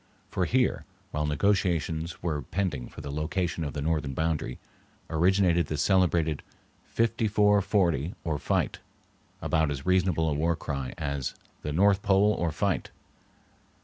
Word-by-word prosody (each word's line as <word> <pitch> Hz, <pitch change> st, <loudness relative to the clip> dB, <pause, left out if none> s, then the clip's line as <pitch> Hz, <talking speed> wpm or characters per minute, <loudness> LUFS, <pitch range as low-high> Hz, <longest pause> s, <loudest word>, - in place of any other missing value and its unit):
For 90 Hz, -, 0 dB
here, 125 Hz, +5 st, +1 dB, 0.3 s
while 75 Hz, 0 st, -1 dB
negotiations 85 Hz, -1 st, 0 dB
were 80 Hz, -4 st, -1 dB
pending 75 Hz, -4 st, -2 dB
for -, -, -10 dB
the 70 Hz, -, -6 dB
location 85 Hz, +3 st, -2 dB
of 70 Hz, -, -4 dB
the 75 Hz, -, -3 dB
northern 75 Hz, -4 st, -1 dB
boundary, 80 Hz, -5 st, -1 dB, 0.5 s
originated 85 Hz, 0 st, +3 dB
the 75 Hz, -, -3 dB
celebrated 85 Hz, -3 st, +2 dB, 0.4 s
"Fifty 115 Hz, -1 st, 0 dB
four 105 Hz, -1 st, +4 dB
forty 90 Hz, -, +1 dB
or 80 Hz, -4 st, -1 dB
fight," -, -, 0 dB, 0.6 s
about 80 Hz, -1 st, +2 dB
as 70 Hz, 0 st, -4 dB
reasonable 90 Hz, -3 st, +2 dB
a 75 Hz, -, +1 dB
war 80 Hz, +3 st, +1 dB
cry 70 Hz, -5 st, -4 dB
as 70 Hz, -3 st, -3 dB, 0.3 s
the 75 Hz, -, -3 dB
"North 100 Hz, +5 st, +4 dB
Pole 100 Hz, +2 st, +4 dB
or 85 Hz, -4 st, -1 dB
fight." -, -, -1 dB
80 Hz, 145 wpm, -28 LUFS, 75-95 Hz, 0.6 s, four